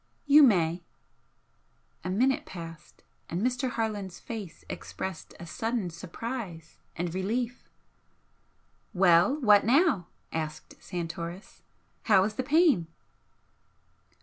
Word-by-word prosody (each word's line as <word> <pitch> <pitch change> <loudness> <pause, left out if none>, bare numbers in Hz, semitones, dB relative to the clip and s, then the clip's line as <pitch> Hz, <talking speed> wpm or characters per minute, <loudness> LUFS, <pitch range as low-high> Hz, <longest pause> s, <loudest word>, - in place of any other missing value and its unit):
"You 290 +1 +8
may." 175 - +4 1.2
A 185 - -3
minute 255 +8 +2
passed, 165 -3 -10 0.3
and 170 - -2
Mr. 250 +1 0
Harland's 210 -6 -3
face 215 -7 -8
expressed 95 - -6
a 170 - -8
sudden 225 +1 -2
surprise 180 - -7 0.2
and 175 -1 -3
relief. 230 +6 -2 1.3
"Well! 180 - +5
What 210 -4 +6
now?" 250 - +3 0.3
asked 155 -1 -4
Santoris 170 +2 -6 0.4
"How 195 -4 +5
is 210 +2 -1
the 240 - -2
pain?" 285 - +3
190 Hz, 100 wpm, -28 LUFS, 170-245 Hz, 1.3 s, You